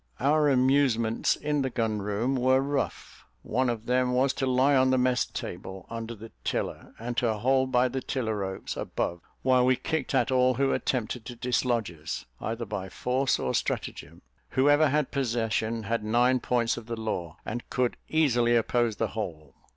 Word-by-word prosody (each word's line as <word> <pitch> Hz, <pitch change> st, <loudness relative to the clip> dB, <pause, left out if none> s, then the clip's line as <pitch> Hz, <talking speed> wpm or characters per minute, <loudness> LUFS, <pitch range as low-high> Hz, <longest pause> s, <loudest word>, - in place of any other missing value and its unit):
Our 150 Hz, +2 st, +3 dB
amusements 130 Hz, -4 st, +3 dB
in 150 Hz, -1 st, -1 dB
the 130 Hz, -, 0 dB
gun 110 Hz, -4 st, -1 dB
room 105 Hz, +6 st, -1 dB
were 130 Hz, +1 st, +3 dB
rough. 140 Hz, 0 st, -3 dB, 0.2 s
One 130 Hz, +2 st, 0 dB
of 115 Hz, -2 st, -3 dB
them 125 Hz, +1 st, +1 dB
was 130 Hz, +2 st, +2 dB
to 135 Hz, -1 st, -1 dB
lie 130 Hz, +2 st, +4 dB
on 130 Hz, 0 st, +4 dB
the 130 Hz, -, +3 dB
mess 125 Hz, -1 st, +2 dB
table, 95 Hz, +1 st, -7 dB
under 115 Hz, 0 st, -5 dB
the 110 Hz, +1 st, -11 dB
tiller, -, -, -3 dB
and 120 Hz, +2 st, -5 dB
to 115 Hz, -3 st, +2 dB
hold 130 Hz, +4 st, +2 dB
by 125 Hz, 0 st, +4 dB
the 130 Hz, +1 st, -3 dB
tiller 115 Hz, -5 st, -2 dB
ropes 95 Hz, -1 st, -4 dB
above, 85 Hz, 0 st, -3 dB, 0.2 s
while 130 Hz, -1 st, +4 dB
we 130 Hz, +1 st, +4 dB
kicked 155 Hz, 0 st, -2 dB
at 125 Hz, -1 st, +2 dB
all 130 Hz, 0 st, +3 dB
who 135 Hz, +2 st, +2 dB
attempted 120 Hz, -2 st, -2 dB
to 120 Hz, -, -7 dB
dislodge 120 Hz, -3 st, 0 dB
us, 80 Hz, -2 st, -6 dB
either 115 Hz, +1 st, -3 dB
by 95 Hz, -2 st, -5 dB
force 130 Hz, +7 st, 0 dB
or -, -, -2 dB
stratagem. 80 Hz, +5 st, -3 dB, 0.3 s
Whoever 145 Hz, +3 st, +4 dB
had 150 Hz, 0 st, 0 dB
possession, 115 Hz, -3 st, -1 dB
had 115 Hz, +1 st, -1 dB
nine 120 Hz, +4 st, +3 dB
points 120 Hz, -1 st, 0 dB
of 115 Hz, -2 st, -8 dB
the 115 Hz, -1 st, -4 dB
law, 90 Hz, -8 st, -4 dB
and 120 Hz, -, -5 dB
could 125 Hz, -1 st, 0 dB
easily 120 Hz, -7 st, +3 dB
oppose 120 Hz, -1 st, +1 dB
the 115 Hz, -1 st, -1 dB
whole. 80 Hz, -10 st, -6 dB
120 Hz, 180 wpm, -28 LUFS, 110-130 Hz, 0.3 s, lie